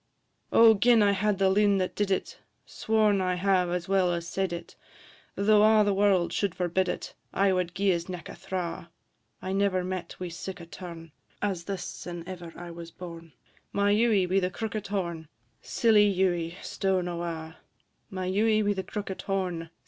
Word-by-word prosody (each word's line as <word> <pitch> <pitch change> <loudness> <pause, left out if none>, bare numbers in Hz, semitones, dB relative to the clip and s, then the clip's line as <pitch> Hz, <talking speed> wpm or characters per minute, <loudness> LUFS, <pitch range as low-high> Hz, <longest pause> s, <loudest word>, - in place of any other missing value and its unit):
O! 230 -1 +8
gin 225 +1 +4
I 200 - +4
had 200 +1 +1
the 195 0 +3
loon 200 0 +4
that 185 -1 -1
did 205 -1 0
it, 190 - -2 0.3
Sworn 215 -3 +1
I 185 -1 0
have 185 -1 +2
as 175 0 -2
well 190 -2 +2
as 170 -1 -3
said 190 0 -1
it, 170 0 -7 0.6
Though 210 +1 +4
a' 215 0 +6
the 205 -1 +2
warld 195 -3 +2
should 200 -4 -1
forbid 180 +1 0
it, - - -4 0.2
I 195 0 +2
wad 180 -1 -1
gie 195 +1 +2
his 170 0 -2
neck 180 -2 -6
a - - -8
thra': 170 -2 -5 0.5
I 185 - -2
never 195 -2 +1
met 185 -1 -5
wi' 180 -1 -4
sic 180 +3 -7
a 170 - -9
turn 170 -2 -9 0.3
As 190 -5 -2
this 195 -2 -4
sin' 175 -1 -7
ever 175 -3 -7
I 175 0 -8
was 170 0 -9
born, 170 -2 -10 0.4
My 200 0 +2
Ewie, 210 -3 +3
wi' 185 +2 +2
the 180 -1 0
crookit 215 +2 -4
horn, 170 -5 -3 0.3
Silly 210 -3 +4
Ewie, 175 -2 0
stown 190 -2 -1
awa'; 170 -2 -5 0.5
My 185 -1 -4
Ewie 215 +3 +2
wi' 205 0 +2
the 190 -1 -4
crookit 195 0 -5
horn, 185 -4 -2
&c. - - -20
185 Hz, 185 wpm, -28 LUFS, 175-200 Hz, 0.6 s, O